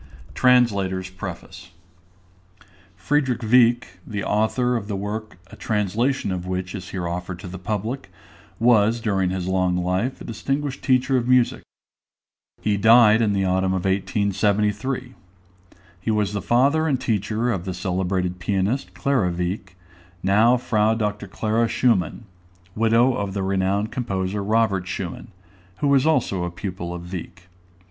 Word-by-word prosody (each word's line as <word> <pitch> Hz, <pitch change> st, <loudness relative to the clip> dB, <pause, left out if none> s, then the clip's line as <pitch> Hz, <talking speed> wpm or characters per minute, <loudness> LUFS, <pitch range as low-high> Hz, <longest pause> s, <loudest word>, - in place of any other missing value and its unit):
_ -, -, -17 dB
TRANSLATOR'S 100 Hz, -8 st, +2 dB
PREFACE. 90 Hz, -1 st, -8 dB, 1.3 s
FRIEDRICH 130 Hz, +5 st, 0 dB
WIECK, 115 Hz, -4 st, +3 dB
the 100 Hz, -2 st, -4 dB
author 125 Hz, +4 st, +1 dB
of 105 Hz, -4 st, -3 dB
the 105 Hz, -, -3 dB
work 105 Hz, +1 st, -5 dB
a -, -, -10 dB
translation 110 Hz, +3 st, -1 dB
of 90 Hz, -1 st, -4 dB
which 90 Hz, 0 st, -3 dB
is 95 Hz, -3 st, -7 dB
here 90 Hz, -3 st, -4 dB
offered 90 Hz, +1 st, -4 dB
to 90 Hz, -, -9 dB
the 90 Hz, +1 st, -7 dB
public, 110 Hz, +7 st, -4 dB, 0.5 s
was 115 Hz, -1 st, +4 dB
during 95 Hz, -5 st, 0 dB
his 95 Hz, -1 st, -3 dB
long 90 Hz, -1 st, +1 dB
life 90 Hz, +8 st, -1 dB
a -, -, -9 dB
distinguished 135 Hz, +5 st, -3 dB
teacher 130 Hz, 0 st, +2 dB
of 120 Hz, -1 st, -1 dB
music. 125 Hz, -1 st, +3 dB, 1.0 s
He 105 Hz, -1 st, +1 dB
died 110 Hz, +1 st, +6 dB
in 105 Hz, -3 st, +2 dB
the 95 Hz, -1 st, +1 dB
autumn 95 Hz, 0 st, +1 dB
of 95 Hz, -, -3 dB
1873. 105 Hz, +5 st, 0 dB, 0.9 s
He 95 Hz, -, -4 dB
was 105 Hz, -2 st, +1 dB
the 100 Hz, -, -2 dB
father 140 Hz, -, +2 dB
and 135 Hz, -5 st, +1 dB
teacher 110 Hz, +2 st, -1 dB
of 95 Hz, -5 st, -3 dB
the 95 Hz, -, -3 dB
celebrated 90 Hz, 0 st, -2 dB
pianist, 100 Hz, +8 st, -1 dB
Clara 130 Hz, -10 st, +1 dB
Wieck, 90 Hz, +2 st, -4 dB, 0.5 s
now 110 Hz, +6 st, +4 dB
Fr. 110 Hz, -2 st, +1 dB
Dr. 105 Hz, -2 st, -2 dB
Clara 110 Hz, +4 st, 0 dB
Schumann, 115 Hz, -3 st, +1 dB, 0.5 s
widow 115 Hz, +4 st, +3 dB
of 100 Hz, -3 st, -3 dB
the 100 Hz, -, -1 dB
renowned 95 Hz, +2 st, 0 dB
composer 100 Hz, -4 st, -2 dB
Robert 105 Hz, -3 st, +1 dB
Schumann, 95 Hz, +2 st, -5 dB, 0.5 s
who 145 Hz, -, 0 dB
was 140 Hz, +1 st, +4 dB
also 100 Hz, -, +1 dB
a 90 Hz, -, -2 dB
pupil 85 Hz, -1 st, -6 dB
of 85 Hz, 0 st, -7 dB
Wieck. 90 Hz, +1 st, -8 dB
105 Hz, 145 wpm, -23 LUFS, 95-120 Hz, 1.3 s, died